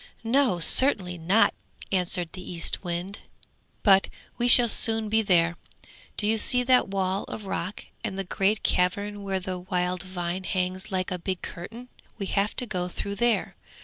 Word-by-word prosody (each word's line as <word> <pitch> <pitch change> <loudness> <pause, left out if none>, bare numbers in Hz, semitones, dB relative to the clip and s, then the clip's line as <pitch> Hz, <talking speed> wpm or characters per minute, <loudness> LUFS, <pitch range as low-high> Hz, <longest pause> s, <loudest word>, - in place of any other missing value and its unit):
'No, 240 -4 +2
certainly 180 -2 +2
not!' 190 +8 +3 0.4
answered 180 -2 +1
the 185 - -9
Eastwind. 175 +2 -3 0.6
'But 195 -2 +5 0.3
we 240 - 0
shall 245 0 +10
soon 225 -1 +2
be 220 +1 +2
there. 170 -4 +2 0.6
Do 210 - 0
you 220 +1 +3
see 250 +3 +4
that 250 0 +3
wall 195 0 -2
of 215 - -8
rock 190 0 -5 0.2
and 200 -4 -4
the 195 - -2
great 195 +3 -1
cavern 200 +3 0
where 195 -1 -3
the 185 0 -6
wild 180 0 -2
vine 185 0 -5
hangs 185 +2 -3
like 185 -1 -2
a 180 - -3
big 185 +1 -4
curtain? 225 +8 -9 0.3
We 200 - -4
have 200 +2 -1
to 250 - -1
go 180 -5 -3
through 200 +3 -6
there! 235 +1 0
190 Hz, 165 wpm, -25 LUFS, 180-215 Hz, 0.6 s, shall